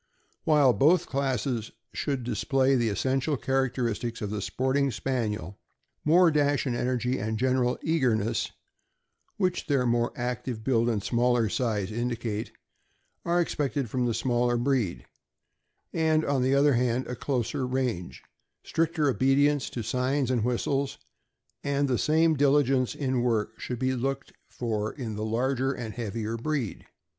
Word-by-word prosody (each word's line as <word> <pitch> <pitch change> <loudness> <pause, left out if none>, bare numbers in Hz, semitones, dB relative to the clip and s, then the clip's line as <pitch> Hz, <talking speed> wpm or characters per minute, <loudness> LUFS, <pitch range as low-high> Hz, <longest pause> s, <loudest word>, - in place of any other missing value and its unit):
While 145 -5 +5
both 165 +7 +4
classes 130 -4 -1 0.2
should 140 -4 -2
display 135 +2 +1
the 120 -3 +2
essential 135 - 0
characteristics 125 -3 -1
of 105 -2 -4
the 105 -1 -3
sporting 130 +6 0
Spaniel, 105 -7 -3 0.4
more 170 +2 +5
dash 145 -2 +2
and 125 -3 -1
energy, 125 +1 0
and 110 +2 -2
general 125 0 +1
eagerness 115 -8 +1 0.9
(which 185 -4 0
their 140 -4 +2
more 120 0 +1
active 120 -2 -3
build 120 -2 +2
and 105 -4 -1
smaller 120 +1 +2
size 105 -4 -1
indicate), 115 -2 -3 0.7
are 175 +1 +2
expected 140 -7 -1
from 125 -1 0
the 115 - 0
smaller 120 0 +1
breed; 120 -7 0 0.9
and, 160 -1 +2
on 140 -2 +1
the 130 +2 +2
other 140 +1 +4
hand, 125 +1 +1
a 125 - -5
closer 125 0 -2
range, 125 -9 -2 0.4
stricter 160 -2 0
obedience 140 +2 +2
to 120 - -5
signs 130 +3 0
and 120 -4 +1
whistles, 135 +3 -1 0.7
and 140 0 +1
the 125 -3 0
same 160 +1 +3
dili 145 +1 +4
gence 130 -1 0
in 130 -3 0
work 115 -3 0
should 125 - -4
be 130 +2 0
looked 135 +2 -3 0.2
for 110 -3 -2
in 120 -6 -5
the 105 - -3
larger 130 +4 0
and 120 -5 -5
heavier 115 -1 -3
breed. 130 -3 -3
125 Hz, 145 wpm, -27 LUFS, 115-140 Hz, 0.9 s, While